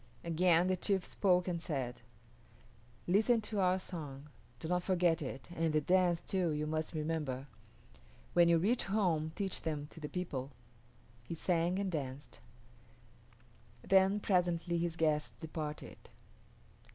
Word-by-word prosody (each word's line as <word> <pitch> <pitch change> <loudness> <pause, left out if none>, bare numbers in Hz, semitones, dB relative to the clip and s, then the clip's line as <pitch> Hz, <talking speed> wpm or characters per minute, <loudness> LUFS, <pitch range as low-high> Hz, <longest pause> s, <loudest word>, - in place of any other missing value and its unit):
Again 170 +1 +3
the 185 0 +2
chief 190 0 0
spoke 180 -2 +2
and 170 -2 -2
said, 135 -8 -3 1.0
"Listen 220 +6 +4
to 210 -1 -3
our 185 -1 +3
song. 150 -6 -7 0.3
Do 160 - -5
not 180 +1 +1
forget 175 -3 +2
it, 135 -1 -6
and 165 -1 +1
the 155 - +3
dance, 175 +2 +3
too, 185 -3 0
you 150 0 -1
must 155 +1 -2
remember. 150 -4 -2 0.9
When 170 -1 +6
you 170 - +5
reach 220 +9 +1
home 175 -7 +1
teach 195 -3 -2
them 150 -2 -3
to - - -10
the 150 -1 -5
people." 140 -8 -4 0.8
He 170 - -4
sang 175 +2 +1
and 195 -1 -1
danced. 140 -3 -5 1.5
Then 190 +2 +5
presently 175 -3 +1
his 170 -1 -1
guests 155 -2 0
departed. 155 -2 -6
170 Hz, 140 wpm, -34 LUFS, 155-185 Hz, 1.5 s, When